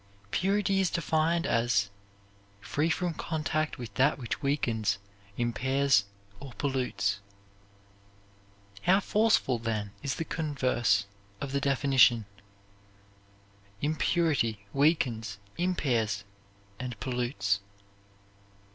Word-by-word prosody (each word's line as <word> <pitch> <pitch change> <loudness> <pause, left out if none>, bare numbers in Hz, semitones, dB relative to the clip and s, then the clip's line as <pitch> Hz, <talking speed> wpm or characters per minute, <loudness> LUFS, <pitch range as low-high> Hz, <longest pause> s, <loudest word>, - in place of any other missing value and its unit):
Purity 195 +1 +2
is 190 -2 +2
defined 165 +1 +1
as 115 -4 +2 0.7
"free 145 +11 -1
from 175 +1 0
contact 155 -1 -2
with 120 -4 -7
that 135 +7 +3
which 120 -1 -4
weakens, 120 -8 0 0.4
impairs 130 +3 +2 0.3
or 135 -2 -9
pollutes." 120 -9 -1 1.6
How 190 +3 +4
forceful 210 - +2
then 110 -3 -2
is 140 - -2
the 165 - -3
converse 130 -11 +1 0.3
of 140 - -4
the 140 0 0
definition: 135 -5 +4 1.6
Impurity 150 - +1
weakens, 125 -8 +1 0.2
impairs, 120 - 0 0.6
and 125 -3 -5
pollutes. 120 -5 0
135 Hz, 90 wpm, -29 LUFS, 115-155 Hz, 1.6 s, How